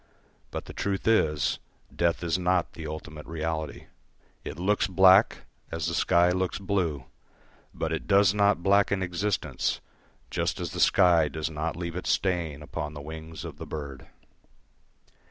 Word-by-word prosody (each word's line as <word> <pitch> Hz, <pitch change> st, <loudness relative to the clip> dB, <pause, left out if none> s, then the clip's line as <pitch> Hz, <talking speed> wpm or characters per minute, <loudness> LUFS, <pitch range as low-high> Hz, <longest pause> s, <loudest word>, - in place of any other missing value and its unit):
But -, -, -5 dB
the -, -, -9 dB
truth 100 Hz, 0 st, -2 dB
is, 80 Hz, -10 st, +2 dB, 0.4 s
death 85 Hz, 0 st, +1 dB
is 85 Hz, +1 st, 0 dB
not 90 Hz, 0 st, +1 dB
the 80 Hz, -1 st, -7 dB
ultimate 75 Hz, 0 st, -8 dB
reality. 80 Hz, -2 st, -4 dB, 0.6 s
It -, -, -6 dB
looks 100 Hz, +4 st, +1 dB
black, 95 Hz, +2 st, +5 dB, 0.3 s
as 80 Hz, -1 st, -2 dB
the 85 Hz, -, -1 dB
sky 85 Hz, 0 st, +3 dB
looks 95 Hz, 0 st, -1 dB
blue; 90 Hz, -9 st, -1 dB, 0.7 s
but 80 Hz, 0 st, -3 dB
it 80 Hz, -, -4 dB
does 100 Hz, -1 st, +5 dB
not 100 Hz, -4 st, +2 dB
blacken 100 Hz, 0 st, +3 dB
existence, 95 Hz, +3 st, -1 dB, 0.5 s
just -, -, -1 dB
as -, -, -4 dB
the -, -, -5 dB
sky 85 Hz, -5 st, +5 dB
does 80 Hz, +2 st, -4 dB
not 80 Hz, +2 st, -3 dB
leave 85 Hz, -1 st, -5 dB
its 90 Hz, -, -3 dB
stain 85 Hz, -6 st, 0 dB
upon 75 Hz, 0 st, -5 dB
the -, -, -6 dB
wings 80 Hz, +2 st, -8 dB
of -, -, -8 dB
the -, -, -8 dB
bird. 70 Hz, -3 st, -7 dB
85 Hz, 155 wpm, -27 LUFS, 80-95 Hz, 0.7 s, black